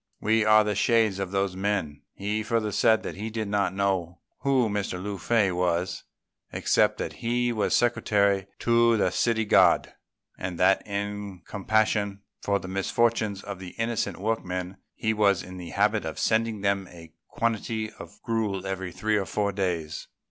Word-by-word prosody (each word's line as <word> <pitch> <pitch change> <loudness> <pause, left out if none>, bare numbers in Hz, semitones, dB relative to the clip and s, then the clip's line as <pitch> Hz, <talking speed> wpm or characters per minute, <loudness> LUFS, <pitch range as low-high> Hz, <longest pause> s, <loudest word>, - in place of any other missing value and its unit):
We 110 +1 +2
are 110 0 +6
the 105 0 -1
shades 110 -1 +2
of 95 -2 -2
those 95 -1 -1
men." 95 -7 -2
He 105 +2 -2
further 110 -1 -1
said 110 +2 +3
he 110 +3 -5
did 110 -1 -3
not 100 -2 +1
know 95 -3 -1 0.2
who 135 -4 +2
Mr. 100 -2 -2
Lung 100 +2 -5
fei 105 -1 +2
was, 90 0 -1 0.5
except - - +2
that - - -4
he 120 +1 0
was 110 -2 +1
secretary 100 -5 +2
to 115 -1 +4
the 95 -3 +2
City 110 +2 +1
God, - - +4 0.5
and 90 -2 -4
that 95 +1 +4
in 100 -2 -4
compassion 100 -1 0 0.2
for 100 0 +1
the 95 - -8
misfortunes 100 +1 0
of 100 -2 -6
the 90 -2 -9
innocent 115 -4 -1
workmen, 95 -3 -3 0.2
he 110 0 0
was 100 -4 +2
in 90 0 -9
the 90 -2 -8
habit 105 +4 +1
of 80 - -5
sending 110 -2 +1
them 100 -1 0
a 85 -2 -14
quantity 110 -1 -2
of 105 - -12
gruel 105 -4 -1
every 95 -1 -4
three 110 +4 0
or 95 -2 -2
four 100 +4 0
days. 90 -5 -3
100 Hz, 165 wpm, -26 LUFS, 95-110 Hz, 0.5 s, are